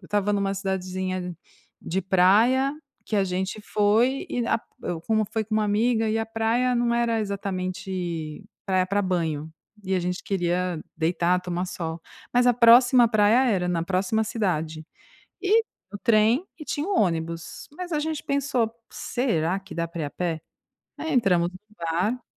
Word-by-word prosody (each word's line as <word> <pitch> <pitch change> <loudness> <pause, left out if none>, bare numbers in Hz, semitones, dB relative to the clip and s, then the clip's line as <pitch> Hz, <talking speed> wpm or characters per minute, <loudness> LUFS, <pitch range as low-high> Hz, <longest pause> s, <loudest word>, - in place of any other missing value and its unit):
estava 205 +2 0
numa 200 -1 0
cidadezinha 185 -2 -3 0.5
de 190 +3 -2
praia, 215 +9 +4 0.3
que 215 - -2
a 200 - +3
gente 190 +3 -3
foi 220 +7 +2
e 240 -2 -1
a - - +2
p - - -26 0.2
eu 175 -2 -3
como 220 +3 +1
foi 220 -1 -1
com 215 +1 -1
um - - +3
amiga 220 +2 +1
e 220 +1 +1
a 225 - 0
praia 225 +3 +1
não 240 0 +1
era 235 -1 +1
exatamente 185 -4 -4 0.2
praia 185 -1 +2
pra 200 +2 +1
banho, 160 -5 -1 0.3
e 190 0 0
a - - +2
gente 180 +1 -3
queria 180 -2 -1 0.2
deitar 175 +2 +1
tomar 180 0 -3
sol, 165 -2 -5 0.3
mas 245 0 +4
a 245 - +5
próxima 240 +1 +7
praia 220 +3 +4
era, 180 -4 0
na 170 -2 0
próxima 195 +5 0
cidade 160 -8 -2 0.6
e 430 +4 +4 0.3
o 205 - -5
trem, 225 - +4
e 305 - -8
tinha 295 +1 -3
um 400 - +1
ônibus, 165 -2 -2
mas 360 +3 -7
a 305 - +1
gente 310 -1 -3
pensou: 275 -5 0 0.2
“Será, 190 -8 -1
que 195 - -11
dá 170 0 -1
pra 170 -1 -5
ir - - -1
a 145 - -6
pé?”. 165 -1 -3 0.6
Aí 320 0 -3
entramos 180 -8 +3
no 185 - -12 0.2
bar 180 +9 -1
195 Hz, 170 wpm, -25 LUFS, 180-230 Hz, 0.6 s, próxima